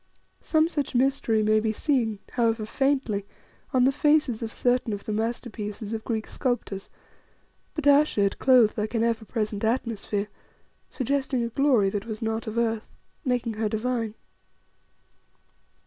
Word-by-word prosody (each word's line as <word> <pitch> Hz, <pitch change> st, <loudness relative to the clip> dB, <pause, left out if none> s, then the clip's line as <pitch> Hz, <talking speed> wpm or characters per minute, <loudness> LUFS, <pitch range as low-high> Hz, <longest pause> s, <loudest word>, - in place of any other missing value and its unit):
Some 315 Hz, 0 st, +2 dB
such 290 Hz, -6 st, -3 dB
mystery 245 Hz, -4 st, +2 dB
may 215 Hz, 0 st, +4 dB
be 220 Hz, 0 st, 0 dB
seen, 230 Hz, -3 st, 0 dB
however 225 Hz, -2 st, +1 dB
faintly, 265 Hz, -5 st, 0 dB, 0.5 s
on 255 Hz, -3 st, +3 dB
the 265 Hz, -, +5 dB
faces 295 Hz, -4 st, +2 dB
of 225 Hz, -1 st, -4 dB
certain 245 Hz, -2 st, +1 dB
of 200 Hz, -, -5 dB
the 215 Hz, -, -3 dB
masterpieces 220 Hz, -1 st, -3 dB
of 220 Hz, -, -3 dB
the -, -, -34 dB
Greek 220 Hz, -2 st, -1 dB
sculptors, 240 Hz, -7 st, -3 dB, 0.9 s
but 310 Hz, -, -3 dB
Ayesha 285 Hz, -5 st, +5 dB
it 200 Hz, -1 st, +1 dB
clothed 245 Hz, -5 st, +5 dB
like 215 Hz, +3 st, -2 dB
an 225 Hz, -, +2 dB
ever 230 Hz, -1 st, 0 dB
present 215 Hz, -2 st, -2 dB
atmosphere, 220 Hz, -3 st, -1 dB, 0.6 s
suggesting 265 Hz, -1 st, -1 dB
a 235 Hz, -, -2 dB
glory 235 Hz, -6 st, +3 dB
that 205 Hz, +2 st, -4 dB
was 220 Hz, -2 st, -5 dB
not 225 Hz, -1 st, -2 dB
of 220 Hz, +1 st, -4 dB
earth, 225 Hz, -1 st, 0 dB, 0.4 s
making 245 Hz, -4 st, 0 dB
her 215 Hz, 0 st, -1 dB
divine. 225 Hz, 0 st, -2 dB
230 Hz, 150 wpm, -26 LUFS, 215-255 Hz, 0.9 s, the